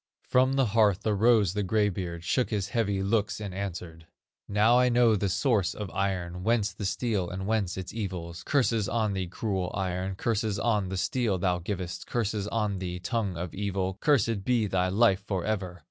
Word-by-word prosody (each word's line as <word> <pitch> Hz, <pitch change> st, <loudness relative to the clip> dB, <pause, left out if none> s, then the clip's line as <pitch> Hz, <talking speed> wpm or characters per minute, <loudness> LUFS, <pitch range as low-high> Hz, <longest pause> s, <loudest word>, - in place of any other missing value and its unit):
From 130 Hz, +1 st, +3 dB
the 135 Hz, -1 st, +3 dB
hearth 105 Hz, -3 st, +2 dB
arose 105 Hz, -2 st, +3 dB
the 105 Hz, -, -1 dB
gray 105 Hz, +2 st, +2 dB
beard, 85 Hz, -3 st, -4 dB
Shook 125 Hz, +8 st, +1 dB
his 100 Hz, -3 st, -2 dB
heavy 100 Hz, -3 st, 0 dB
locks 105 Hz, +1 st, 0 dB
and 100 Hz, -3 st, -5 dB
answered: 90 Hz, -4 st, -6 dB, 0.4 s
"Now 110 Hz, +4 st, +4 dB
I 125 Hz, 0 st, +4 dB
know 120 Hz, -2 st, +4 dB
the 100 Hz, -1 st, 0 dB
source 105 Hz, -2 st, +1 dB
of 105 Hz, -3 st, -6 dB
iron, 90 Hz, -2 st, -2 dB
Whence 110 Hz, -1 st, +1 dB
the 105 Hz, 0 st, -6 dB
steel 100 Hz, -5 st, -1 dB
and 95 Hz, +2 st, -5 dB
whence 105 Hz, -4 st, 0 dB
its 95 Hz, -1 st, -6 dB
evils; 90 Hz, -6 st, -5 dB
Curses 115 Hz, -, +1 dB
on 110 Hz, -2 st, 0 dB
thee, 95 Hz, -2 st, -2 dB
cruel 95 Hz, -1 st, -2 dB
iron, 95 Hz, 0 st, -2 dB
Curses 110 Hz, 0 st, -1 dB
on 105 Hz, -4 st, +1 dB
the 95 Hz, -, -3 dB
steel 115 Hz, -1 st, 0 dB
thou 90 Hz, -1 st, 0 dB
givest, 90 Hz, 0 st, -5 dB
Curses 105 Hz, -3 st, -1 dB
on 105 Hz, -3 st, -1 dB
thee, 90 Hz, -1 st, -4 dB
tongue 95 Hz, 0 st, -2 dB
of 85 Hz, -1 st, -5 dB
evil, 95 Hz, -1 st, -2 dB
Cursed 115 Hz, -9 st, +2 dB
be 120 Hz, -1 st, +2 dB
thy 95 Hz, -2 st, +1 dB
life 100 Hz, -1 st, +3 dB
forever! 95 Hz, -2 st, -2 dB
100 Hz, 185 wpm, -28 LUFS, 95-110 Hz, 0.4 s, Now